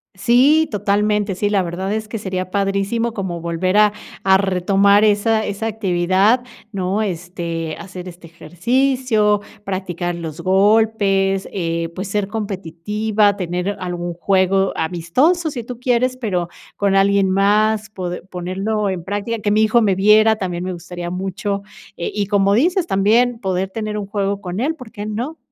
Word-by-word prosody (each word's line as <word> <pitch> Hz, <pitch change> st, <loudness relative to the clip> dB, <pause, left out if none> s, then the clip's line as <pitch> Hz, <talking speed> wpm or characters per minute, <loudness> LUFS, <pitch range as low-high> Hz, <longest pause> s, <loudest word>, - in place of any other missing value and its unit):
Sí, 270 Hz, +10 st, +4 dB
totalmente, 210 Hz, 0 st, 0 dB
sí, 205 Hz, +3 st, 0 dB
la 205 Hz, -1 st, +2 dB
verdad 185 Hz, +3 st, -3 dB
es 220 Hz, 0 st, -3 dB
que 225 Hz, -, -5 dB
sería 185 Hz, -3 st, -4 dB
padrísimo 200 Hz, +4 st, 0 dB
como 190 Hz, -5 st, -4 dB
volver 170 Hz, +3 st, 0 dB
a 210 Hz, -1 st, +5 dB, 0.3 s
a 190 Hz, 0 st, +5 dB
retomar 195 Hz, +2 st, +3 dB
esa 220 Hz, +1 st, +2 dB
esa 205 Hz, +3 st, -3 dB
actividad, 195 Hz, +2 st, +2 dB, 0.3 s
¿no? 195 Hz, +1 st, -1 dB
Este, 170 Hz, -3 st, -4 dB
hacer 185 Hz, +1 st, -9 dB
este 175 Hz, -1 st, -11 dB
ejercicio, 215 Hz, +5 st, +1 dB, 0.2 s
practicar 180 Hz, -3 st, -3 dB
los 165 Hz, -1 st, -6 dB
golpes, 195 Hz, 0 st, +2 dB
eh, 165 Hz, -2 st, -2 dB
pues, 190 Hz, +3 st, -5 dB
ser 200 Hz, 0 st, -1 dB
competitiva, 205 Hz, +1 st, -1 dB
tener 180 Hz, +2 st, -2 dB
algún 175 Hz, -1 st, -4 dB
juego 190 Hz, +1 st, +2 dB
amistoso 250 Hz, -, +1 dB
si 245 Hz, -4 st, -5 dB
tú 240 Hz, +1 st, -8 dB
quieres, 250 Hz, 0 st, +1 dB
pero 185 Hz, -8 st, -2 dB, 0.3 s
con 200 Hz, -1 st, +1 dB
alguien 195 Hz, 0 st, +3 dB
más, 210 Hz, +3 st, +2 dB
pode 180 Hz, -4 st, -5 dB
ponerlo 190 Hz, +4 st, -2 dB
en 185 Hz, -3 st, -4 dB
práctica. 205 Hz, +5 st, -3 dB
Que 205 Hz, -1 st, -1 dB
mi 215 Hz, +1 st, +3 dB
hijo 220 Hz, +2 st, +4 dB
me 200 Hz, -3 st, +3 dB
viera 215 Hz, +3 st, +5 dB
también 180 Hz, -4 st, -4 dB
me 185 Hz, 0 st, -3 dB
gustaría 175 Hz, 0 st, -7 dB
mucho, 195 Hz, +2 st, -3 dB, 0.3 s
eh, 170 Hz, -, -4 dB
y 205 Hz, -1 st, -1 dB
como 200 Hz, 0 st, +2 dB
dices 345 Hz, -, +2 dB
también, 230 Hz, -, +2 dB
poder 190 Hz, -2 st, -1 dB
tener 215 Hz, +1 st, -4 dB
un 200 Hz, -, -5 dB
juego 200 Hz, 0 st, -2 dB
con 180 Hz, 0 st, -5 dB
él, 300 Hz, +5 st, 0 dB
¿por 255 Hz, -8 st, -12 dB
qué 210 Hz, -2 st, -6 dB
no? 240 Hz, +9 st, -4 dB
200 Hz, 160 wpm, -19 LUFS, 185-215 Hz, 0.3 s, a